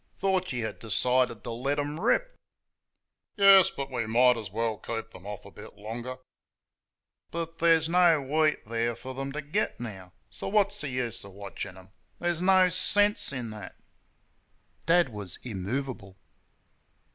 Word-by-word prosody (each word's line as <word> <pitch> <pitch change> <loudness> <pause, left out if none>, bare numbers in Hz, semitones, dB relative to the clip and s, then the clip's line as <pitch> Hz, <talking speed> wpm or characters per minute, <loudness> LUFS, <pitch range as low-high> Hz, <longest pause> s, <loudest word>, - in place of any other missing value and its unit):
Thought 190 -3 0
you 120 -3 -2
had - - -6
decided 125 0 +1
to 120 - -5
let 130 +5 -1
them 145 +2 -3
rip?" - - +1 1.0
"Yes, 195 -2 +8
but 140 0 -6
we 120 -3 -2
might 125 +2 +5
as 110 -4 -6
well 110 +2 -1
keep 115 0 -5
them 95 +2 -12
off 105 -1 -7
a - - -12
bit - - -12
longer." 120 +4 -6 1.1
"But 165 0 -5
there's 165 -1 +4
no 170 -2 +5
wheat 150 +3 +1
there 115 +1 -1
for 130 +3 -8
them 135 +1 -4
to 150 +1 -4
get 155 +9 -1
now. 95 -6 -8 0.2
So - - -6
what's 205 0 +2
the 145 - -4
good 125 -3 -2
of 100 -1 -12
watching 100 -1 -7
them? 95 +1 -15 0.3
There's 175 -1 -1
no 185 0 +5
sense 205 +3 +2
in 125 -5 -5
THAT." 105 -1 -9 1.1
Dad 170 -3 +5
was 105 -6 -5
immovable. 105 -1 -4
130 Hz, 155 wpm, -28 LUFS, 110-165 Hz, 1.1 s, Yes